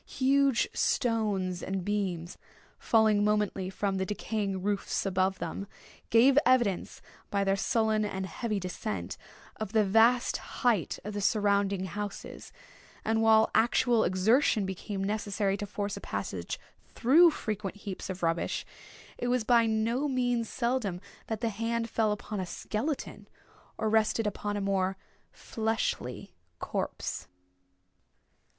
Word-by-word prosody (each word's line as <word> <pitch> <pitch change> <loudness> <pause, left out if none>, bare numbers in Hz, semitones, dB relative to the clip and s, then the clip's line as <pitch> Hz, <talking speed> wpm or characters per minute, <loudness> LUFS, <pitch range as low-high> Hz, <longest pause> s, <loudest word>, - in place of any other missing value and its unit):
Huge 275 -1 +2
stones 205 -7 0
and 190 -2 -3
beams 190 -5 -2 0.4
falling 220 -2 +3
momently 210 -3 0
from 195 0 -1
the 190 - 0
decaying 205 -3 -2
roofs 205 0 -1
above 190 0 +1
them, 175 +4 -5 0.4
gave 260 +5 +6
evidence, 240 -8 +1 0.3
by 200 -1 +1
their 195 0 +2
sullen 220 0 +1
and 190 -2 -3
heavy 210 +4 -3
descent, 105 - -4 0.4
of 215 -1 -5
the 220 -1 +4
vast 225 +5 +4
height 225 -9 0
of 210 +2 -5
the 205 - -3
surrounding 200 -2 +2
houses; 205 +2 -6 0.5
and 220 0 +2
while 220 0 +5
actual 235 0 +3
exertion 210 +4 +3
became 190 +1 -4
necessary 205 -1 -1
to 205 +1 -5
force 200 0 -3
a - - -8
passage 95 -3 -4 0.4
through 320 +9 +6
frequent 210 - -4
heaps 200 -2 -7
of 185 -1 -5
rubbish, 165 0 0 0.5
it 245 - -2
was 245 -1 +1
by 230 0 +4
no 225 +6 0
means 245 -4 0
seldom 235 -7 -1 0.3
that 220 -1 -3
the 230 - +1
hand 230 +2 -2
fell 220 -1 +1
upon 210 0 -4
a 185 - -2
skeleton 250 - -4 0.5
or 220 - -1
rested 220 +1 +2
upon 205 0 -2
a - - -2
more 195 -1 0 0.3
fleshly 220 - -3 0.2
corpse. - - -4
210 Hz, 130 wpm, -29 LUFS, 195-230 Hz, 0.5 s, gave